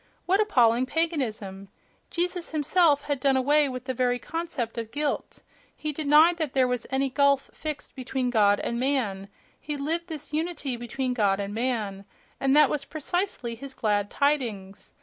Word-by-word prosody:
What 385 +3 +2
appalling 250 - +3
paganism!—Jesus 290 - -3
him 300 - 0
self 310 -2 +3
had 285 -2 -2
done 270 0 +3
away 290 +2 +3
with 255 -1 -6
the 260 - -2
very 245 0 +1
concept 290 -6 -4
of 225 -1 -5
"guilt," 290 +3 -3 0.3
he 305 - -2
denied 310 +3 +5
that 315 -5 -2
there 260 -2 +3
was 250 -2 -2
any 270 +1 +1
gulf 280 0 +2
fixed 305 -2 -5
between 255 -1 -2
God 205 -3 +4
and 235 - -2
man; 225 -8 -1 0.3
he 295 -1 -5
lived 325 +5 -2
this 310 -3 -5
unity 305 -5 -2
between 250 +2 -3
God 205 -5 +1
and 200 0 -4
man, 215 -5 -2 0.3
and 270 +1 +2
that 300 -1 +7
was 290 -2 -1
precisely 315 -5 -2
his 265 +4 -9
"glad 205 -2 0
tidings".... 230 -10 -1
265 Hz, 165 wpm, -26 LUFS, 235-300 Hz, 0.3 s, that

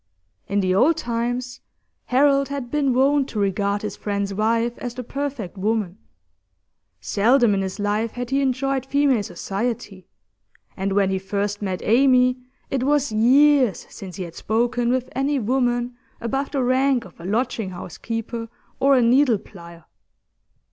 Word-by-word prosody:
In 200 +1 +1
the 185 -1 +1
old 290 - +4
times, 245 0 -3 0.4
Harold 275 +1 +3
had 275 -4 -5
been 290 -3 +1
wont 275 +2 +2
to 215 - -4
regard 200 +1 0
his 210 - -4
friend's 200 -1 -3
wife 230 +3 0
as 245 -1 -5
the 250 - -5
perfect 255 -8 -5
woman; 210 -2 -1 1.0
seldom 235 +2 +3
in 195 - 0
his 190 -1 -4
life 210 +2 -1
had 245 0 -5
he 275 +1 +2
enjoyed 270 0 0
female 270 -3 +2
society, 195 +1 -4 0.7
and 195 +1 -2
when 195 -1 +2
he 190 - 0
first 200 +2 -3
met 190 -3 -3
Amy 255 +2 +4 0.3
it 270 - 0
was 285 -1 +1
years 255 +1 +4
since 185 -2 -9
he 190 - -4
had 170 -2 -8
spoken 240 +4 0
with 255 0 0
any 280 +2 +1
woman 245 0 0 0.2
above 270 +4 -2
the 275 -3 -1
rank 255 -1 +2
of 180 - -16
a - - -10
lodging 225 0 -1
house 175 -1 -9
keeper 230 0 -4 0.3
or 275 0 +4
a 250 - +4
needle 245 0 +4
plier. 170 -4 -13
235 Hz, 155 wpm, -22 LUFS, 200-265 Hz, 1.0 s, old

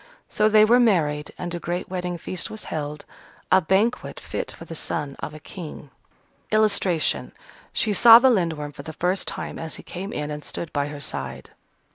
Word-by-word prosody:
So 215 0 +3
they 215 0 +7
were 240 +3 +5
married, 155 -10 +2
and 175 -1 -5
a 175 - -3
great 175 +1 -3
wedding 180 -1 -3
feast 170 +1 -4
was 220 - -7
held, 150 -1 -5 0.5
a 190 - +6
banquet 195 +8 +1
fit - - -4
for - - -11
the - - -8
son 145 -3 -3
of - - -6
a - - -9
king. 155 -4 -9 0.6
[Illustration: 200 -6 +1 0.4
She 215 - 0
saw 230 +3 +10
the 260 +2 +5
Lindworm 165 -8 0
for - - -10
the 160 - -8
first 180 +4 0
time - - -4
as 160 -1 -3
he - - -10
came 190 +3 -6
in 150 0 -3
and 150 0 -6
stood 170 - -6
by 145 -1 0
her 145 0 -7
side. - - -5
175 Hz, 190 wpm, -24 LUFS, 150-205 Hz, 0.6 s, saw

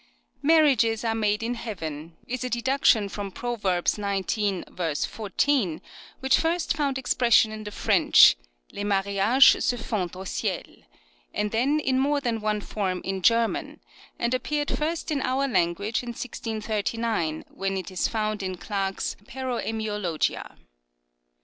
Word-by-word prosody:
" - - -43
Marriages 240 -8 +4
are 225 - +1
made 210 -1 0
in 235 +2 -1
Heaven 165 -9 -6
" - - -31
is 255 +1 -3
a 250 - -2
deduction 240 -3 +2
from 200 0 -5
Proverbs 200 -5 -1
xix. 195 -5 -1
14, 215 - 0 0.4
which 265 0 +3
first 330 -2 0
found 280 -3 0
expression 240 -4 +3
in 215 0 -7
the - - -4
French, 205 - +5 0.2
" - - -29
Les 205 - -4
mariages 200 +6 +4
se 245 - +1
font 190 -7 -3
en 190 +1 -7
ciel," - - -2 0.7
and 210 0 -1
then 270 +7 +2
in 260 -3 +1
more 285 +2 +2
than 235 -5 -2
one 210 0 0
form 190 -3 -3
in 190 0 -3
German, 230 +3 +1 0.4
and 235 +1 0
appeared 290 +4 -1
first 320 +1 -2
in 285 -3 0
our 270 +2 0
language 200 0 0
in 245 - -7
1639, 220 -6 -3
when 195 0 -2
it 190 0 -5
is 185 - 0
found 215 -1 -2
in 185 -1 -4
Clerk's 195 0 -3
" - - -25
Paroemiologia." 220 -9 -3
220 Hz, 150 wpm, -26 LUFS, 195-250 Hz, 0.7 s, French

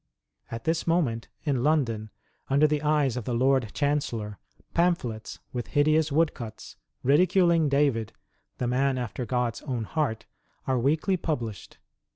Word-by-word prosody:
At 115 0 -6
this 160 +1 0
moment, 145 -10 +1 0.2
in 140 -5 0
London, 120 -7 +1 0.4
under 140 +3 +4
the 150 -1 +1
eyes 150 -4 +2
of 125 -4 -4
the 120 - -1
Lord 130 -2 +2
Chancellor, 120 -8 -1 0.3
pamphlets, 170 -11 0 0.2
with 120 -2 -3
hideous 155 +1 +2
woodcuts, 130 -8 -1 0.3
ridiculing 170 - +4
David, 135 -6 +1 0.5
''the 125 - -1
man 130 +2 +1
after 120 0 -4
God's 120 -5 -1
own 125 -5 -3
heart," 130 -2 -2 0.4
are 130 -2 +1
weekly 155 +9 +1
published. 120 - -4
135 Hz, 135 wpm, -27 LUFS, 115-155 Hz, 0.5 s, under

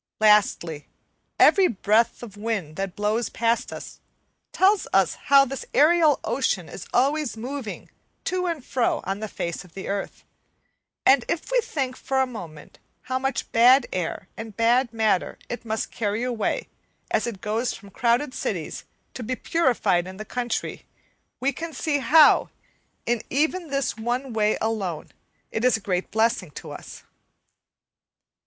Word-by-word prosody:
Lastly, 205 -8 +3 0.5
every 385 -2 +6
breath 220 +3 +1
of 215 -4 -9
wind 205 -8 -3
that 195 0 -4
blows 210 +2 0
past 230 0 0
us - - -9 0.5
tells 390 +1 +3
us 190 -3 +3 0.2
how 275 0 +8
this 270 0 -5
aerial 315 -1 +5
ocean 220 -8 0
is 175 - -9
always 275 0 +1
moving 250 -1 -6 0.4
to 365 0 -1
and 325 -7 -3
fro 250 -2 0
on 195 +2 -3
the 215 - -4
face 170 -3 -4
of 180 -3 -19
the 195 - -6
earth; 200 0 -4 0.8
and 265 -2 +6
if 340 +8 -3
we - - +4
think 265 - -3
for 265 0 -1
a 265 - +4
moment 170 -12 -10 0.2
how 260 0 -2
much 270 -1 -2
bad 245 +3 +6
air 185 +1 -3
and 220 -2 -8
bad 240 +2 +3
matter 220 -5 +1
it 240 0 -5
must 220 0 -2
carry 215 +1 -2
away, 240 -4 -1 0.4
as - - +1
it 220 -5 -5
goes 220 +5 -1
from 200 -3 -13
crowded 250 +3 +1
cities - - -4 0.3
to - - -7
be 250 +2 -2
purified 220 - +1
in 190 0 -9
the 215 - -7
country, 245 0 -3 0.5
we 275 +2 +1
can 325 +4 -6
see 290 +1 0
how, 295 +4 +6 0.6
in 240 -2 0
even 320 +6 0
this 275 -2 -1
one 240 +3 -2
way 215 -1 +2
alone, 200 -8 -2 0.4
it 220 - -2
is 250 -2 +4
a - - -10
great 185 -3 -2
blessing 220 -5 +1
to - - -9
us. - - -10
235 Hz, 155 wpm, -24 LUFS, 205-270 Hz, 0.8 s, how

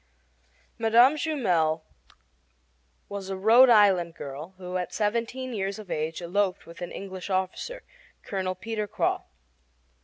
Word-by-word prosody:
Mme. 235 +4 +6
Jumel 180 - +1 1.2
was 200 -1 -6
a 190 - -3
Rhode 230 +6 +7
Island 190 -7 +5
girl 145 +7 -8
who 180 0 -4
at 180 - -3
seventeen 235 +4 -1
years 195 -1 -2
of 210 -4 -10
age 160 +3 -2
eloped 185 +2 0
with 170 +1 -13
an 175 - -5
English 190 -1 -7
officer, 190 - -2 0.4
Colonel 185 -2 -2
Peter 220 -1 -4
Croix. - - 0
195 Hz, 125 wpm, -27 LUFS, 180-225 Hz, 1.2 s, Rhode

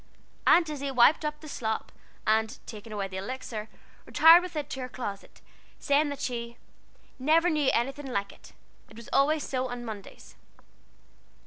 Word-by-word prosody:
Aunt 340 -2 +6
Izzie 280 -2 -4
wiped 265 +4 +5
up 300 0 -3
the 310 - -10
slop, 220 -6 -3 0.3
and 220 0 +1
taking 220 0 -10
away 200 -2 -3
the 190 0 -7
Elixir, 220 0 -5 0.4
retired 325 +2 +8
with 360 -2 -8
it 295 -2 -3
to 265 - -4
her 255 -1 -5
closet, 205 -5 -7 0.4
saying 290 +1 +2
that 285 - -6
she 235 -1 -4 0.6
"never 325 +6 +3
knew 300 -3 +2
anything 270 +4 -1
like 200 -6 -2
it - - -17 0.4
it 220 - -15
was 235 - -11
always 295 +2 +2
so 260 -1 -1
on 245 0 -6
Mondays." 210 -3 -10
255 Hz, 160 wpm, -28 LUFS, 220-300 Hz, 0.6 s, retired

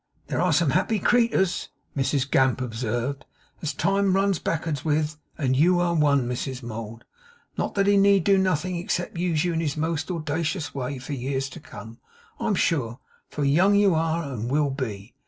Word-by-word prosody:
'There - - -2
are - - +2
some - - +3
happy 225 - +1
creeturs,' 205 -4 +2 0.3
Mrs 135 0 0
Gamp 130 -1 +3
observed, 120 +2 -3 0.4
'as 155 - -1
time 195 +5 +1
runs 195 -2 +2
back'ards 160 -3 -2
with, 155 0 0 0.2
and 130 -4 +1
you 175 +6 +4
are 175 -1 +1
one, 145 -5 +3
Mrs 125 +1 -4
Mould; 115 0 -7 0.5
not - - -2
that 200 -1 +2
he 200 0 +4
need 200 -2 +5
do 195 +2 +4
nothing 185 -1 0
except 175 0 -3
use 170 -3 +1
you 175 - 0
in 160 - 0
his 155 -2 -2
most 160 -1 -1
owldacious 160 -1 -2
way 135 0 -3
for 130 +3 -6
years 135 +1 -2
to 165 - -10
come, 115 -7 -11 0.4
I'm 210 - 0
sure; 130 -11 0 0.3
for 150 - -3
young 175 +9 +4
you 200 -2 +4
are 165 +1 0
and 125 -5 -4
will 145 +1 +1
be. 115 -6 -5
150 Hz, 180 wpm, -25 LUFS, 130-175 Hz, 0.5 s, need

